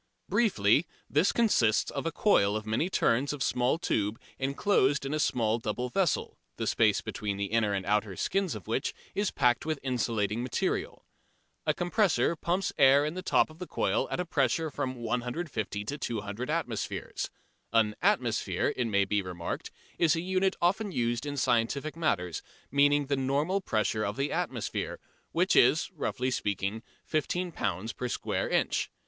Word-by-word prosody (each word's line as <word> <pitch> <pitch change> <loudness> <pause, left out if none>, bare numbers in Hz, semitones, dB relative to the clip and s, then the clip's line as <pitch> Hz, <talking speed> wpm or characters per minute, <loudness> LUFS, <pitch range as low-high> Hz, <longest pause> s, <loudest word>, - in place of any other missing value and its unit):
Briefly, 155 - +3 0.2
this 150 +7 +3
consists 125 - +2
of - - -3
a - - -1
coil 105 - +3
of 110 0 -3
many 110 +11 0
turns 140 -4 +2
of 140 -3 -2
small 125 +5 +1
tube 110 - -1 0.2
enclosed 140 0 +2
in 135 - -2
a 155 - 0
small 115 -5 +1
double 125 +3 -3
vessel, 180 +4 0 0.2
the - - -2
space - - +3
between 100 -2 -4
the 100 - -1
inner 115 -2 +2
and 95 -1 -3
outer 105 -1 0
skins 190 - 0
of 105 - -8
which - - -2 0.2
is 205 0 0
packed 125 -3 +2
with 155 -1 -1
insulating 115 -4 0
material. 125 0 -2 0.6
A - - +3
compressor 175 -1 +2
pumps 175 +4 -1
air 140 +1 +6
in 155 - -2
at - - -12
the 185 - -3
top 180 - +2
of 155 - -16
the 180 - -6
coil - - 0
at - - -2
a 180 - 0
pressure 145 0 +1
of 155 - -5
from 130 0 -2
150 120 -2 -3
to 145 +7 -3
200 110 +2 -4
atmospheres. 150 -9 -3 0.4
An 110 -2 +3
"atmosphere," - - +1
it 125 - 0
may 100 -2 +2
be 100 +1 +1
remarked, 90 -2 -5 0.3
is 165 -2 +4
a 165 - -1
unit 190 +1 +1
often 200 +4 +1
used 120 -1 -1
in 145 0 -4
scientific 130 +5 +1
matters, 90 - -1 0.3
meaning 145 +1 +4
the 140 +1 0
normal 145 +9 0
pressure 110 - 0
of 105 +1 -2
the 140 +1 -1
atmosphere, - - -3 0.3
which - - +2
is, - - +4
roughly 130 +1 -2
speaking, 100 -1 -2 0.2
15 175 +3 -1
lb. 105 - -3
per 125 - -3
square - - -2
inch. - - +1
130 Hz, 170 wpm, -29 LUFS, 110-160 Hz, 0.6 s, air